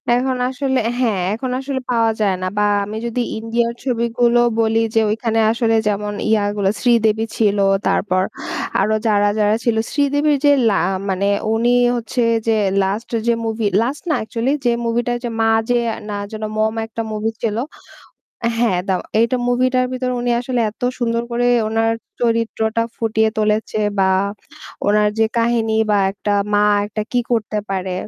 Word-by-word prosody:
এখন 255 +1 0
আসলে 265 0 -1 0.2
হ্যাঁ, 215 -7 +1
এখন 250 +4 -3
আসলে 270 0 -3
পাওয়া 230 -1 +2
যায় 195 -3 +2
না। 185 - -1
বা 210 - +3 0.2
আমি 215 +2 -6
যদি 235 +1 -1 0.2
ইন্ডিয়ার 235 +1 -1
ছবিগুলো 235 -1 +1 0.2
বলি 225 0 +2 0.2
যে, - - +5
ওইখানে 225 +1 0
আসলে 230 -1 +1
যেমন 205 0 -1 0.2
ইয়া 215 -2 +3
গুলো 200 -2 +1
শ্রীদেবী 225 -2 +2
ছিল, 210 -2 +2 0.3
তারপর 185 -2 +1 0.6
আরও 215 +2 +2
যারা, 205 -1 +3
যারা 210 0 +3
ছিল। 235 -2 +1 0.2
শ্রীদেবীর 290 +1 +2
যে 285 - +6 0.2
লা 200 - +2 0.3
মানে 190 +1 0 0.3
উনি 240 +2 +2 0.2
হচ্ছে 240 +1 -2 0.3
যে 225 - +4 0.3
last 200 +4 -2 0.2
যে 235 - +4
movie 220 -1 -1
last 265 +5 -2
না - - +3
actually 230 +4 -1
যে 240 - +4
movieটা 240 +1 0
যে 240 - -2
মা 225 0 +3 0.2
যে 245 - +3 0.3
না 205 - -3 0.2
যেন 215 0 -6
Mom 220 0 +1
একটা 225 0 -5
movie 215 +1 -2
ছিল 220 -2 -1 1.0
হ্যাঁ 230 -6 +2
দাও। 185 -2 +1 0.2
এইটা 235 +2 +2
movie 255 +1 +2
টার 255 0 +3
ভিতর 255 0 -2
উনি 245 - -1
আসলে 250 -1 -2
এত 220 - -25 0.2
সুন্দর 235 -1 0
করে 245 +1 +1 0.2
ওনার 225 +1 +1 0.3
চরিত্রটা 230 -1 0
ফুটিয়ে 220 -1 +1
তুলেছে 215 0 0 0.2
বা 190 0 +3 0.8
ওনার 210 +1 +3
যে 220 - +4
কাহিনী 230 -1 +1
বা 205 - +3
একটা 205 0 -3 0.2
মা 205 0 +4 0.2
একটা 215 +1 -4
কী 245 - +2
করতে 215 -2 0
পারে? 190 -1 -2
225 Hz, 165 wpm, -19 LUFS, 210-240 Hz, 1.0 s, যে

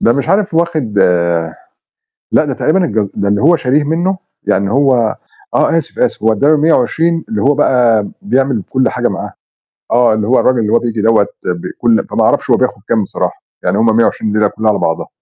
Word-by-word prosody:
ده 115 - +3
مش 140 +4 -2
عارف 195 0 +1
واخد 155 -11 -1 1.3
لأ، - - +3
ده 145 - -3
تقريبًا 160 +8 +1
الجز 105 - -1
ده 100 - -1
اللي 100 0 +1
هو 170 +5 +4
شاريه 145 +1 0
منّه 175 +5 -1 0.3
يعني 100 0 0
هو 125 -4 +2 0.4
آه، 165 - +2
آسف، 160 - -7
آسف - - 0
هو 110 +1 +3
أدى 140 - 0
له 155 +1 +5
120 160 +2 +1
اللي 220 - -2
هو 145 +2 +3
بقى 120 -7 +2
بيعمل 135 - 0
كل 130 -1 +1
حاجة - - -1
معاه، - - -6 0.6
آه، 120 -1 +3
اللي 110 -1 -2
هو 125 +3 +3
الراجل 130 -1 +2
اللي 110 -2 -1
هو 115 - +5
بييجي 115 -3 -3
دَوّة 110 -2 +3 0.2
ب 90 0 -3
كل 115 -2 +1
فما - - +1
أعرفش - - +1
هو - - +5
بياخُد 100 - -2
كام 115 -2 +1
بصراحة، 95 - -4 0.2
يعني - - 0
هم 110 -1 +2
120 115 -1 +1
الليلة 105 0 +2
كلّها 110 +2 -2
على 105 - 0
بعضها. 80 - -2
125 Hz, 205 wpm, -14 LUFS, 110-155 Hz, 1.3 s, له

